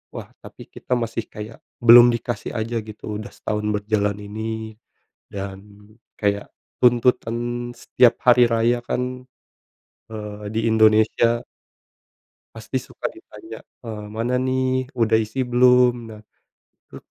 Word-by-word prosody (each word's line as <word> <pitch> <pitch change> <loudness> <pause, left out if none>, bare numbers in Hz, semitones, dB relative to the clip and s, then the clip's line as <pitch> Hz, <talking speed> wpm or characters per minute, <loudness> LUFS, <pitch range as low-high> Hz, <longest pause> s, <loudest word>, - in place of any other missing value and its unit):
Wah, - - -8
tapi - - -12
kita 125 - -3
masih 115 0 -4
kayak 105 +2 -9 0.2
belum 120 +1 +9
dikasih 120 -1 -5
aja 115 +1 -2
gitu 110 - -11 0.2
udah 110 - -8
setahun 105 0 -4
berjalan 105 -1 0
ini 110 +1 -6 0.6
dan 100 -1 -6 0.6
kayak 100 -1 -1 0.3
tuntutan 120 -1 +3 0.4
setiap 120 0 +2
hari 125 0 +7
raya 115 +1 +2
kan, 125 0 -3 0.9
eee, 105 -1 -7
di - - +1
Indonesia 110 +2 +3 1.1
pasti 115 +4 -4
suka - - -6
ditanya, 340 0 -12 0.2
eee, 105 -2 -6
"Mana 115 +3 -1
nih, 130 +1 -1
udah 115 -3 +1
isi 110 +3 -1
belum?" 125 0 +5 0.2
Nah, 105 0 -11 0.7
itu - - -11
115 Hz, 120 wpm, -22 LUFS, 110-125 Hz, 1.1 s, belum